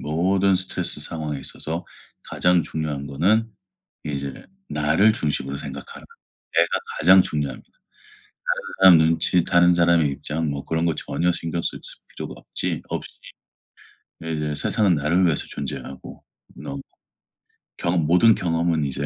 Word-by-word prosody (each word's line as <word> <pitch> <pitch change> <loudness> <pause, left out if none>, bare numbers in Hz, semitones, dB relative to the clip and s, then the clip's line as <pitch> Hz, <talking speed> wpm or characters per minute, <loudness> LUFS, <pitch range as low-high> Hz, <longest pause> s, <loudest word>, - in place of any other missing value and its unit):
모든 95 +5 +2
스트레스 95 0 -3
상황에 75 -3 -4
있어서 80 +5 -4 0.4
가장 90 -1 +2
중요한 75 -3 -4
거는 100 +11 +1 0.5
이제 70 -2 -4 0.4
나를 80 +9 +3
중심으로 70 - -2
생각하라. 70 -1 -8 0.5
내가 - - +5 0.3
가장 95 +3 +7
중요합니다. 75 -5 -4 0.9
다른 - - -7
사람 95 -3 +9
눈치, 80 +2 +2
다른 85 0 +4
사람의 85 -3 +4
입장 75 +3 -3
뭐 70 -1 -4
그런 80 +1 -1
거 80 -3 +1
전혀 90 +1 -1
신경 85 0 -3
쓸 - - -3
수 - - -12
필요가 - - -7
없지 - - -4
없이 - - -5 1.1
네 80 0 -4
이제 75 -1 -2
세상은 95 +2 +2
나를 80 +6 +2
위해서 80 -4 +1
존재하고 70 -1 -7 0.3
너무. 70 0 -7 1.0
경험 85 -2 0
모든 100 +6 +5
경험은 85 -2 0
이제 70 +1 -3
80 Hz, 300 characters per minute, -23 LUFS, 75-90 Hz, 1.1 s, 사람